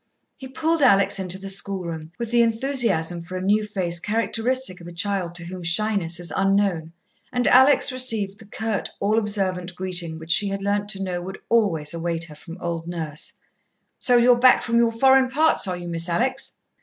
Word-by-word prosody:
He 265 - -10
pulled 320 +4 -1
Alex 200 -6 +3
into 185 -1 -2
the 195 +1 -9
schoolroom, 175 -5 -2
with 235 -1 -5
the 240 0 +4
enthusiasm 230 - 0
for 180 +2 -7
a - - -5
new 210 +2 +1
face 180 -4 -2
characteristic 225 0 -1
of 170 - -11
a - - -8
child 180 -1 -1
to 170 0 -8
whom 180 +1 -8
shyness 175 0 +1
is 175 -1 -4
unknown, 195 -4 0 0.4
and 245 -1 -1
Alex 265 +2 +6
received 220 -6 +3
the 220 - -13
curt, 220 0 -3
all 215 +3 +1
observant 190 -4 -2
greeting 180 -3 -4
which 160 +1 -5
she 200 +4 +5
had 195 0 -4
learnt 205 0 -1
to 195 -2 -1
know 180 -2 -3
would 190 +2 -7
always 175 -10 +1
await 165 0 -2
her 155 -2 -9
from 165 +3 -11
old 170 -1 -4
Nurse. 160 -4 -5 0.7
"So 250 -1 +3
you 240 +1 +5
are 240 - -2
back 255 0 +5
from 235 0 +1
your 235 -1 +3
foreign 265 +2 +4
parts, 305 -4 +1
are 180 -1 -3
you, 175 0 -8
Miss 170 0 -2
Alex?" 255 +10 -1
195 Hz, 195 wpm, -22 LUFS, 175-230 Hz, 0.7 s, Alex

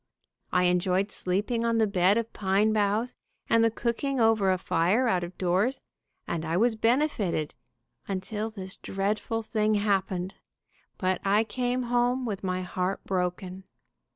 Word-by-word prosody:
I 180 - +3
enjoyed 180 +2 +1
sleeping 205 +6 -1
on 230 0 +1
the 220 - +4
bed 195 0 +3
of 230 -1 -2
pine 205 +2 +2
boughs, 215 +4 +1 0.3
and 230 0 +4
the 230 - +5
cooking 240 +4 -2
over 225 -4 +3
a 185 - +2
fire 180 +8 +1
out 185 -5 +1
of 175 +1 -8
doors, 195 +9 +1 0.5
and 160 - -2
I 165 +1 -1
was 230 +3 +3
benefited, 225 - 0 0.5
until 205 +3 -3
this 190 -3 -6
dreadful 210 +3 -2
thing 215 -1 +1
happened, 195 -3 0 0.6
but 185 -1 0
I 205 +2 +3
came 250 +2 -1
home 245 +1 +1
with 200 -4 -4
my 185 -1 -1
heart 185 +1 -2
broken. 185 0 -3
205 Hz, 150 wpm, -27 LUFS, 185-230 Hz, 0.6 s, the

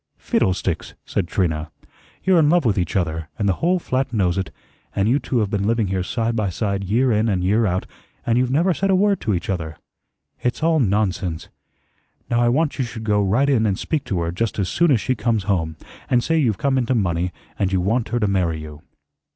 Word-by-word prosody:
"Fiddlesticks!" 90 -2 -1
said 95 - -2
Trina. 80 -4 -1 0.5
"You're 185 -2 +4
in 150 -2 +4
love 175 -2 +3
with 110 -4 +3
each 90 -1 -2
other, 80 -4 -1
and 105 - 0
the 95 - +3
whole 180 +2 +3
flat 130 -6 -1
knows 95 -7 +1
it; 95 -3 -2 0.5
and 100 +1 +1
you 130 +5 +3
two 130 - -2
have 105 -2 -1
been 100 0 0
living 115 -3 +1
here 95 -1 0
side 115 +5 -1
by 105 -3 0
side 100 +1 -2
year 120 +7 +2
in 110 +1 +2
and 90 -3 0
year 105 +4 +2
out, 90 0 -1 0.4
and 115 - +2
you've 125 -1 +1
never 170 +8 +2
said 195 +3 -1
a 190 - +4
word 200 +1 +2
to 105 -4 0
each 85 - -4
other. 80 -5 -3 0.6
It's 125 +5 -1
all 165 -1 +3
nonsense. 100 - 0 0.8
Now, 120 0 +3
I 120 - +4
want 145 +4 0
you - - +2
should 120 -2 -6
go 105 -1 +2
right 105 +8 +2
in 115 -6 +3
and 95 -2 0
speak 155 -3 -2
to 95 - -1
her 85 0 -1
just 110 +5 -2
as 95 -4 0
soon 170 0 +2
as 130 -6 +4
she 130 - 0
comes 110 -2 0
home, 85 -5 -1 0.3
and 120 -1 +3
say 165 - +1
you've 125 -11 +2
come 135 +2 +1
into 125 +1 0
money 90 -4 0 0.3
and 95 -1 +1
you 95 - +2
want 110 +5 0
her 120 +2 0
to 105 - +1
marry 90 -5 0
you." 75 -1 -9
105 Hz, 230 wpm, -21 LUFS, 95-125 Hz, 0.8 s, You're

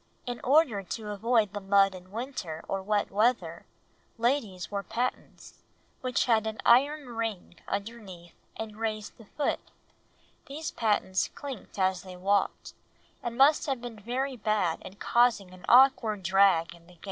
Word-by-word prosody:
In 245 -1 -5
order 270 -7 +3
to 210 +3 -6
avoid 220 0 +1
the 205 - -3
mud 195 0 +4
in 185 0 -12
winter 210 - -5
or 195 - -2
wet 205 +1 0
weather, 205 -5 0 0.5
ladies 225 -7 -1
wore 200 -1 -2
pattens, 240 +5 -5 0.4
which 255 -1 0
had 220 -2 +2
an 220 0 -4
iron 280 +3 +4
ring 225 -6 -4
underneath 200 -5 -6 0.2
and 215 -1 -6
raised 215 -1 -4
the 225 - -13
foot, 295 - 0 0.9
these 305 +3 -5
pattens 205 -4 0
clinked 270 -9 -8
as 185 -1 +1
they 185 -1 -10
walked, 200 +2 0 0.5
and 235 0 -5
must 285 +4 +5
have 270 -3 -1
been 235 -2 -8
very 255 +5 -2
bad 210 -7 0
in 185 - -10
causing 225 -4 +2
an 185 0 -12
awkward 235 -6 +5
drag 190 -3 +3
in 170 0 -19
the 180 - -17
gait. 170 - -23
215 Hz, 155 wpm, -28 LUFS, 190-245 Hz, 0.9 s, must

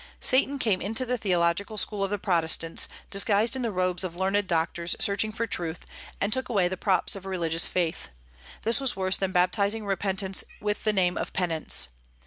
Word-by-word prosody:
Satan 270 +2 +2
came 215 -8 0
into 225 +6 -2
the 250 0 -2
theological 185 +2 0
school 205 0 -1
of 195 - -1
the 205 - -1
Protestants, 165 -4 +1 0.2
disguised 205 +4 +3
in 260 - -3
the 235 - -1
robes 185 -1 0
of 175 -2 -5
learned 190 +2 0
doctors 170 +1 0
searching 205 +2 +1
for 225 +2 -2
truth, 175 -6 -4 0.3
and 200 +2 0
took 260 0 -1
away 195 -6 +2
the 185 - -3
props 190 +1 +1
of 195 -1 -8
religious 170 -3 +1
faith. 170 - -2 0.5
This 230 +5 +3
was 270 - +1
worse 190 0 +1
than 195 -1 -1
baptizing 200 +4 +1
repentance 195 -1 -1 0.2
with 210 +1 -2
the 215 - +3
name 180 -2 +1
of - - -4
penance. 165 - +2
195 Hz, 185 wpm, -27 LUFS, 180-215 Hz, 0.5 s, disguised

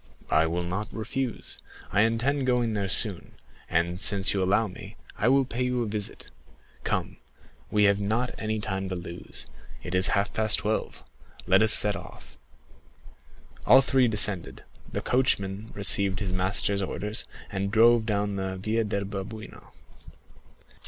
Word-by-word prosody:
"I 80 +1 +4
will 85 +2 -2
not 95 +5 -4
refuse; 115 +2 -5 0.3
I 105 - +3
intend 125 +5 +1
going 120 -3 +1
there 100 -2 -2
soon, 100 -2 +4 0.3
and 85 +2 0
since 100 -3 +4
you 100 - 0
allow 100 +4 +2
me, 90 - -11 0.2
I 105 - 0
will 135 +1 +4
pay 125 0 -5
you 125 -1 0
a - - -4
visit. 105 -1 -4 0.5
Come, - - -2 0.5
we 105 0 +2
have 100 0 +4
not 110 +5 -1
any 110 0 -2
time 95 -2 -3
to 95 - -3
lose, 85 0 -7 0.4
it 90 - -6
is 90 0 +4
half 100 +1 -1
past 110 -2 +2
twelve—let 95 -2 -2
us 110 0 +5
set 105 -1 +2
off." - - -11 1.3
All 130 +2 +8
three 130 -1 +2
descended; 105 -5 0 0.3
the - - -3
coachman 105 -5 0
received 100 -1 +3
his 95 -4 -3
master's 100 +2 +1
orders, 105 +3 -3 0.3
and 100 -1 -2
drove 115 +1 +4
down 100 -1 -1
the 95 0 -3
Via 110 +4 -1
del 100 -2 -2
Babuino. 100 +2 -8
105 Hz, 150 wpm, -26 LUFS, 95-115 Hz, 1.3 s, All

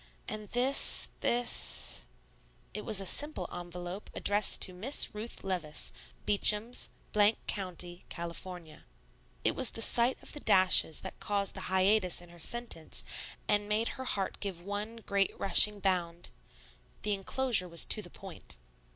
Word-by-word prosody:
And 215 -1 -6
this 255 +5 +2
this 240 0 +2 0.3
" - - -34
It 210 - -6
was 215 -4 0
a 195 - -5
simple 295 +10 0
envelope 175 +2 -8
addressed 205 0 +3
to 185 - -2
Miss 230 +11 +3
RUTH 215 +3 -8
LEVICE 175 -6 -2 0.3
Beacham's... 210 +3 +4 0.6
County 180 -2 -5
Cal. 170 0 -6 1.1
It - - +1
was 260 -3 +3
the 225 - -5
sight 240 +2 +2
of - - -7
the 295 - -6
dashes 185 - +5
that - - -10
caused 200 -1 -2
the 190 - -8
hiatus 190 0 +2
in 175 0 -8
her 175 0 -16
sentence, 235 -4 -2 0.4
and 205 0 0
made 220 +2 0
her 260 - -8
heart 195 -6 -4
give 190 -4 -6
one 205 +3 -5
great 200 -1 -1
rushing 205 +1 +5
bound. 175 -3 -2 0.7
The 210 - 0
enclosure 200 -1 0
was 170 -1 +5
to 215 - +2
the 175 - -9
point. 185 - -11
200 Hz, 145 wpm, -30 LUFS, 180-215 Hz, 1.1 s, dashes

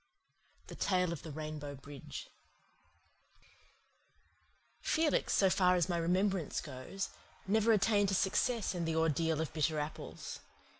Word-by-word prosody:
THE - - -10
TALE 180 -3 +1
OF 165 - -7
THE 160 - -8
RAINBOW 150 -1 -5
BRIDGE 140 +1 -9 2.5
Felix, 315 -1 +2
so 195 - +5
far 180 -1 +4
as 180 0 +1
my 175 - +1
remembrance 180 +1 +1
goes, 145 +8 -5 0.4
never 220 +3 +3
attained 205 -1 +4
to 195 - +1
success 220 +4 +1
in 175 -2 -2
the 165 0 -1
Ordeal 160 0 +2
of 160 - -4
Bitter 155 0 +1
Apples. 150 +1 -5
170 Hz, 130 wpm, -34 LUFS, 155-195 Hz, 2.5 s, so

